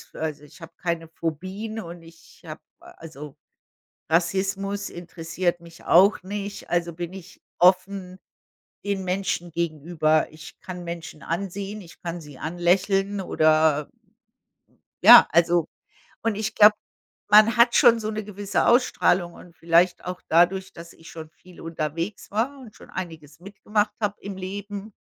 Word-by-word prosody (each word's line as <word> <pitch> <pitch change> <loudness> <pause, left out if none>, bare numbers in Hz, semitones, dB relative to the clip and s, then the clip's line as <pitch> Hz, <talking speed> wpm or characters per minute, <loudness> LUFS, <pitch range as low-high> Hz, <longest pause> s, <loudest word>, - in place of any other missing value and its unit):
also 155 -2 -4
ich 150 +4 -17
habe 165 - -10
keine 170 -2 -3
Phobien 185 +8 -5
und 170 0 -10
ich 165 +2 -18
habe 155 0 -9 0.2
also 150 -3 -12 0.7
Rassismus 195 +4 -1
interessiert 175 0 -3
mich 170 -1 -15
auch 190 +3 +4
nicht. 200 +1 -6
Also 170 -1 -1
bin 175 +1 -6
ich 190 0 -12 0.2
offen 185 0 +2 0.7
den 200 -2 -2
Menschen 180 -2 -2
gegenüber. 155 -1 0
Ich 155 0 -13
kann 180 -2 -8
Menschen 170 -3 -8
ansehen, 195 +4 -4
ich 170 -3 -15
kann 170 0 -5
sie 145 -4 -13
anlächeln, 195 +4 0
oder 155 -3 +2 1.1
ja, - - +10
also 170 -1 +3 0.6
und 225 -2 0
ich 215 +1 -4
glaube, 210 0 +8 0.5
man 215 +2 +6
hat 235 0 +5
schon 230 -1 +6
so 215 0 -3
'ne 215 -1 -4
gewisse 205 -1 -2
Ausstrahlung 190 -8 +2
und 175 -2 -15
vielleicht 170 +2 +2
auch 180 0 -6
dadurch, 180 +3 +2
dass 170 0 -12
ich 165 - -16
schon 160 -1 -10
viel 180 +1 -17
unterwegs 165 +5 -5
war 255 +7 -1
und 235 -5 -13
schon - - -16
einiges 160 -5 -8
mitgemacht 205 +3 -2
habe 205 -1 -2
im 200 -1 -7
Leben, 200 +2 -7
180 Hz, 140 wpm, -24 LUFS, 165-200 Hz, 1.1 s, ja